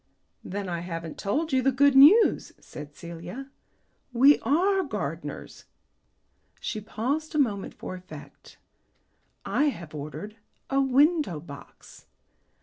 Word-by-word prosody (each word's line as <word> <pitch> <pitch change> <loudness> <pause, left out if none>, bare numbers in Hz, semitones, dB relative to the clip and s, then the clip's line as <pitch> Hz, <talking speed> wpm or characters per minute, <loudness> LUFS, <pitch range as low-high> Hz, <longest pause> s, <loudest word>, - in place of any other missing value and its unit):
"Then 200 +1 -5
I 170 -1 -3
haven't 165 -2 -6
told 295 +9 -1
you 260 - +3
the 270 +2 +2
good 280 +1 +4
news," 320 +12 +6
said 145 0 -11
Celia. 175 +11 -9 0.6
"We 270 +4 +6
are 370 - +2
gardeners." 300 -6 -6 0.9
She 215 - -4
paused 280 +10 -3
a - - +1
moment 215 -9 0
for - - -7
effect. 185 +1 -12 0.9
"I 295 - +1
have 170 - -4
ordered 155 +9 -7 0.3
a 275 0 +3
window 275 - +2
box." 145 -3 -14
245 Hz, 120 wpm, -26 LUFS, 175-285 Hz, 0.9 s, news